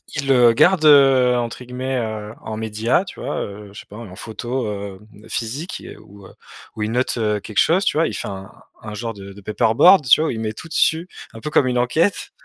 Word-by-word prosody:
Il 140 -2 -3
le 125 -3 +5
garde, 180 +7 +3
heu, 135 -4 +6
entre 120 +1 -4
guillemets, 130 +1 -4
heu, 110 -2 -4
en 110 - -6
média, 110 - 0
tu 185 - -10
vois, - - -3
heu? 100 0 -8
Je 105 - -11
sais - - -12
pas, 105 - -14
en 105 -6 -10
photo, 120 +3 -4
hem, 100 -2 -6 0.3
physique 135 +10 -4
et - - -10
ou 100 -1 -16
heu - - -17 0.4
ou 105 - -3
il 105 - -2
note, 125 +1 0
heu, 105 -2 0
quelque 105 0 -10
chose, 185 +4 +3
tu - - +1
vois? 165 - +3
Il - - -5
fait - - -4
un 95 -1 -8 0.3
un 110 0 -8
genre 115 +2 -5
de 100 -1 -11
de 100 +1 -13
paperboard, 115 - +4
tu 125 - +6
vois, 160 - +1
où - - -1
il 110 - -5
met 110 -1 -2
tout 165 - -10
dessus, 165 +1 +1 0.3
un 115 - -10
peu 150 - -5
comme 140 - +2
une 125 -1 0
enquête 140 +11 0
115 Hz, 240 wpm, -20 LUFS, 105-135 Hz, 0.4 s, heu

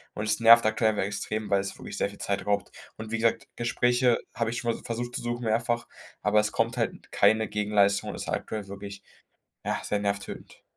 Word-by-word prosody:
und 105 - -3
es 105 0 +1
nervt 115 0 +9
aktuell 110 0 +2
einfach 105 - -1
extrem, 105 +1 -3
weil 100 -1 +3
es 100 - -5
wirklich - - -7
sehr - - +1
viel 100 - -14
Zeit 100 0 -2
raubt. 100 0 0 0.3
Und 110 0 -7
wie 115 - 0
gesagt, 115 0 +1
Gespräche 120 +1 +2 0.2
habe 115 -1 0
ich 120 - -3
schon 120 -1 0
mal - - -10
versucht 120 +1 -4
zu - - -3
suchen, 120 0 -3
mehrfach, 120 +1 0 0.3
aber 105 +1 +3
es 105 - -2
kommt 115 +2 0
halt 115 - -3
keine 110 0 +4
Gegenleistung 105 -1 +2
und - - -7
es - - -4
ist - - -7
aktuell 105 -3 -3
wirklich, 100 0 -8 0.6
ja, - - -1
sehr 105 - -1
nervtötend. 100 0 -4
110 Hz, 215 wpm, -27 LUFS, 100-115 Hz, 0.6 s, nervt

